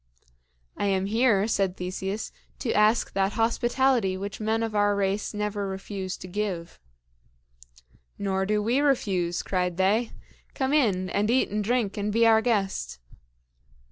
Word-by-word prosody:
"I 205 - -1
am 190 -1 +1
here," 215 -1 +2
said 195 -4 0
Theseus, 190 +3 -4 0.3
"to 235 - -2
ask 215 +2 +3
that 195 +1 +1
hospitality 235 -2 +1
which 200 +1 -6
men 220 +1 0
of 225 -1 -3
our 205 -1 +2
race 200 +1 -1
never 210 -1 -3
refuse 190 0 -5
to 185 - -9
give." 185 -3 -4 1.4
"Nor 190 -1 -1
do 210 0 +1
we 240 +5 +2
refuse," 195 -12 +1
cried 180 -2 -1
they. 210 +5 +2 0.5
"Come 265 0 0
in, 195 -11 +2
and 210 +2 0
eat 255 -2 +2
and 210 0 -1
drink 225 -2 0
and 205 0 -1
be 230 +2 +3
our 220 -1 +5
guest." 195 - -1
205 Hz, 145 wpm, -26 LUFS, 190-225 Hz, 1.4 s, our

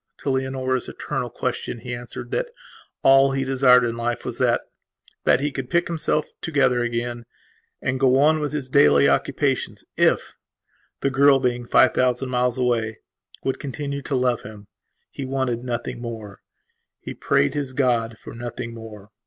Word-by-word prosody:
To 140 - 0
Leonora's 130 -1 -1
eternal - - -4
question - - -3
he 125 -1 -5
answered 120 0 -7
that - - -1 0.5
all 135 0 +6
he 135 0 0
desired 130 -1 +5
in 115 -1 -1
life 120 0 -3
was - - -5
thatthat 130 - -1
he 145 +1 -1
could 130 -2 -5
pick 170 0 +2
himself 155 -2 0 0.2
together 135 -5 +2
again 120 0 -3 0.6
and 130 0 -1
go 130 -1 +4
on 155 +3 +4
with 150 -1 -2
his 145 -3 -4
daily 70 - +5
occupations 70 0 0
ifthe - - +2 0.8
girl, 140 +1 +5
being 120 -2 -1
five 130 - +5
thousand 130 +1 +1
miles 125 0 0
away, 115 -3 0 0.5
would 135 - -1
continue 140 0 -4
to 140 - -3
love 125 -2 +1
him. 105 -1 -11 0.5
He 140 - -6
wanted 130 -3 -2
nothing 120 -1 -4
more, 110 -4 -7 0.6
He - - -7
prayed 70 - +1
his 140 -3 -3
God 120 -4 +1
for - - -11
nothing 120 0 -6
more. 110 -2 -11
125 Hz, 155 wpm, -23 LUFS, 120-135 Hz, 0.8 s, all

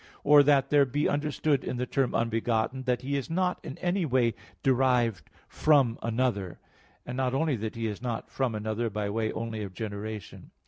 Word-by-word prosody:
Or 145 0 +7
that 140 -1 +3
there 145 -1 +6
be 145 +3 0
understood 145 -1 0
in 125 - -3
the 125 - -1
term 135 0 0
"unbegotten" 115 +2 0
that 125 0 0
He 140 +2 -1
is 140 - -4
not 180 +2 0
in 140 -4 -7
any 180 +1 0
way 125 -6 +2 0.3
derived 125 - +2 0.2
from 140 -7 +3
another; 115 -6 -1 0.5
and 125 - -5
not 130 0 0
only 155 0 +1
that 110 +1 -4
He 115 0 -3
is 105 -1 -4
not 120 -3 -4
from 130 -4 -1
another 110 +2 -2
by 105 -1 -3
way 110 0 -1
only 115 -1 -4
of 95 -3 -7
generation. 105 -1 -6
125 Hz, 185 wpm, -28 LUFS, 110-140 Hz, 0.5 s, Or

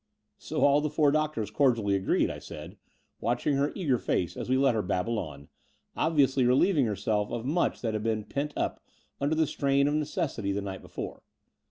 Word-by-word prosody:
* - - -51
' - - -52
So - - -3
all 145 +1 +5
the 150 - -1
four 150 -1 +3
doctors 150 -9 -1
cordially 115 -4 +2
agreed," 95 -1 +1
I - - -7
said, - - -9 0.4
watching 150 - 0
her 140 +1 +1
eager 140 - +1
face, 90 - -1
as - - -5
we 130 - +3
let 135 -2 +4
her 110 - +1
babble 105 +4 -1
on, 70 -1 -7 0.5
obviously 140 -4 +2
relieving 135 +3 +3
herself 105 0 -1
of 120 0 -3
much 160 +6 0
that 115 -3 -1
had 110 - -1
been 110 -1 -1
pent 140 +6 -3
up - - -2 0.4
under 145 +3 +1
the 160 0 +3
strain 140 -1 +1
of 145 - +1
necessity 150 - -1
the 100 - -1
night 95 -1 -6
before. - - -7
130 Hz, 200 wpm, -28 LUFS, 110-150 Hz, 0.5 s, all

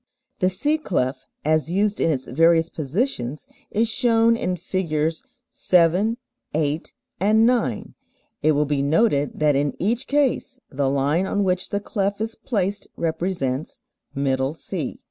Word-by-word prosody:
The 185 - +3
C 295 +12 0
clef 130 - -2 0.2
as 155 +1 +2
used 205 +3 +1
in - - +3
its 135 -4 -1
various 165 +4 +3
positions 150 - -2 0.2
is 225 +2 +1
shown 230 -1 +3
in 185 -5 -1
Figs. 165 -3 -1 0.3
7, 180 +6 +3 0.4
8, 155 0 -1 0.3
and 215 +4 +4
9. 230 - 0 0.5
It 155 +1 +4
will 150 +1 +2
be 145 -1 0
noted 145 0 +2
that 150 -2 +3
in 140 +1 0
each 230 +7 0
case 280 -2 0
the 135 0 0
line 145 +7 +1
on 205 +1 0
which 185 -1 0
the 200 - -1
clef 200 -1 -2
is 225 +1 -2
placed 205 -5 -2
represents 160 -5 -2 0.4
"middle 135 0 0
C." 160 -3 -5
170 Hz, 145 wpm, -23 LUFS, 145-210 Hz, 0.5 s, and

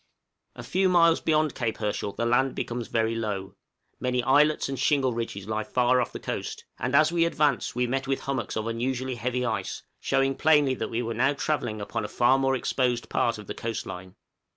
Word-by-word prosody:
A - - -8
few 190 0 +1
miles 170 -2 +4
beyond 155 -2 +2
Cape 115 -3 -2
Herschel 105 -1 -2
the 115 - -2
land 130 +3 +2
becomes 120 -1 -3
very 115 0 0
low; 105 -4 -3 0.5
many 125 -1 0
islets 150 +4 +3
and 135 -2 -4
shingle 135 -2 +2
ridges 115 -4 -4
lie 110 0 -1
far 125 +2 +2
off 120 - -3
the - - -7
coast; - - -5
and 130 - -1
as 155 +2 +5
we 170 -1 +2
advanced 150 -8 +1
we 125 0 +1
met 135 +2 -2
with 135 0 -1
hummocks 130 -7 -3
of 110 - -2
unusually 125 +3 -2
heavy 125 +1 -2
ice, 110 -5 -3 0.2
showing 135 0 +1
plainly 150 -2 +4
that 110 -3 -4
we 115 +1 -2
were 115 0 -3
now 130 +5 +2
travelling 130 -7 -2
upon 100 - -3
a - - -3
far 120 +5 +3
more 135 0 +2
exposed 125 -2 -1
part 115 -1 +1
of 105 - -10
the - - -5
coast 115 -1 -4
line. 95 0 -8
125 Hz, 205 wpm, -26 LUFS, 115-135 Hz, 0.5 s, as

